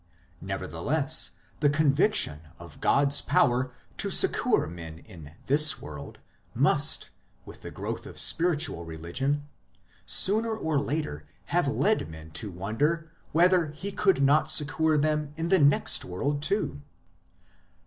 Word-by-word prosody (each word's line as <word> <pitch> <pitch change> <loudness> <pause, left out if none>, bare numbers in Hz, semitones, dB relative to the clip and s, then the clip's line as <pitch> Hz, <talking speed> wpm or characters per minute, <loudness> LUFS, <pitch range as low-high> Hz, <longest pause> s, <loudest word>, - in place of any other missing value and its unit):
Nevertheless, - - -1 0.3
the 145 - +2
conviction 145 - +2 0.2
of 85 -3 -14
God 140 0 +2
s 140 - +6
power 125 0 +1 0.3
to - - +1
succour - - +3
men 80 0 -9
in 80 -3 -14
this 150 +3 +4
world 75 -1 -10 0.4
must, - - +2 0.3
with - - -13
the - - -8
growth - - -6
of - - -12
spiritual 160 - +2
religion, 85 - -4 0.6
sooner 220 - +1
or 160 -8 -1
later 140 - -4 0.3
have - - +2
led 80 - 0
men 80 0 -12
to 105 +7 -1
wonder 145 - -2 0.2
whether 175 0 +3
He 155 +7 -7
could 190 -8 +1
not 145 +3 +3
succour 155 +1 +2
them 150 0 -1
in 165 +1 -3
the 190 - +4
next 145 -1 +3
world 140 +11 -3
too. 155 - -2
145 Hz, 130 wpm, -26 LUFS, -, 0.6 s, s